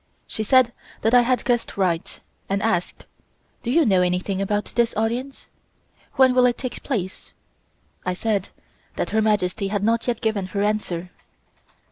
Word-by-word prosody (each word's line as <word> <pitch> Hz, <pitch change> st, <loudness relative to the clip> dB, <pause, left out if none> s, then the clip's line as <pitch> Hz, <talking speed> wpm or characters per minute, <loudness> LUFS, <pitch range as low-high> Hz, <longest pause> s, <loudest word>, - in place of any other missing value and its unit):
She -, -, -5 dB
said 240 Hz, +2 st, +4 dB, 0.3 s
that 225 Hz, -, +2 dB
I 245 Hz, -, +8 dB
had 250 Hz, +1 st, 0 dB
guessed 240 Hz, -4 st, 0 dB
right, 180 Hz, -3 st, -1 dB, 0.3 s
and 195 Hz, +1 st, 0 dB
asked: 180 Hz, -6 st, -1 dB, 0.6 s
"Do 235 Hz, -, -4 dB
you 320 Hz, +5 st, +4 dB
know 190 Hz, -5 st, +4 dB
anything 180 Hz, +2 st, 0 dB
about 205 Hz, +1 st, -1 dB
this 235 Hz, -1 st, +2 dB
audience? 240 Hz, +5 st, -2 dB, 0.7 s
When 260 Hz, -1 st, +5 dB
will 250 Hz, 0 st, +5 dB
it 240 Hz, -, 0 dB
take 255 Hz, -2 st, -5 dB
place?" 200 Hz, -9 st, -4 dB, 0.7 s
I 180 Hz, 0 st, -1 dB
said 205 Hz, -1 st, -1 dB, 0.5 s
that -, -, -2 dB
Her 220 Hz, -, +2 dB
Majesty 205 Hz, -1 st, +1 dB
had 200 Hz, 0 st, -2 dB
not 230 Hz, +3 st, +1 dB
yet 240 Hz, -2 st, 0 dB
given 215 Hz, -4 st, -1 dB
her 200 Hz, +2 st, -2 dB
answer. 185 Hz, -4 st, -2 dB
215 Hz, 160 wpm, -23 LUFS, 195-240 Hz, 0.7 s, I